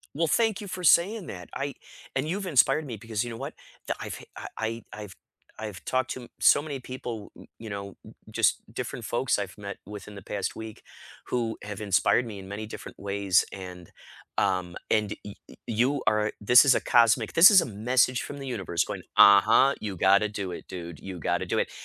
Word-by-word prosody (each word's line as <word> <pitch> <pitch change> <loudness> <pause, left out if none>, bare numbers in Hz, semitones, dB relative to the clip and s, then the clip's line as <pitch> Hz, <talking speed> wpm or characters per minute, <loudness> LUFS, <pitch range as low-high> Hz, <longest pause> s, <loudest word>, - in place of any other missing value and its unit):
Well, 165 +1 +1
thank 220 +5 +2
you 205 - -7
for 180 -1 -6
saying 185 +5 +4
that. 90 -2 -8
I 140 0 -3 0.4
and 135 +3 0
you've 195 +3 -2
inspired 145 0 +3
me 120 -5 -6
because 110 +1 -3
you 120 - -5
know 115 - -7
what? - - -6 0.3
Tha - - 0
I've - - -5
f - - -13 0.3
I 115 0 -3
I 105 - -8
I've 105 -3 -9 0.4
I've 105 -3 -7
talked 130 -1 0
to 125 -2 -7
so 145 - +5
many 145 -3 -5
people, 120 -4 -7
n - - -13
you 110 -1 -8
know, 100 0 -5
n - - -13
n - - -14
just - - +2
different - - -5
folks 120 +1 0
I've 100 -4 -5
met 100 -1 -7
within 105 +1 -9
the 100 - -10
past 100 0 -3
week 110 -1 -8 0.5
who 115 -2 -2
have 105 -1 -6
inspired 100 +4 +2
me 105 -4 -7
in 95 - -10
many 105 +2 -5
different 105 - -9
ways, 100 -2 +1
and, 90 -2 -9 0.5
um, 90 -3 0
and 105 -1 +1
y 105 - -9
y - - -14
you 125 +6 +1
are 105 0 +2
this 125 +6 +7
is 135 - +6
a - - +2 0.2
cosmic 115 -1 +4
this 170 +6 +9
is 195 -3 +8
a - - -2 0.2
message 125 0 +3
from 145 - -7
the 135 - -7
universe 95 -8 -1
going, - - -6
"Uh-huh, 110 +7 +7
you 100 -3 -4
gotta 100 +4 +4
do 100 -3 -4
it, 85 - -8
dude, 85 -3 -8
you 95 -2 -8
gotta - - -1
do - - 0
it," - - -1
110 Hz, 215 wpm, -27 LUFS, 100-130 Hz, 0.5 s, this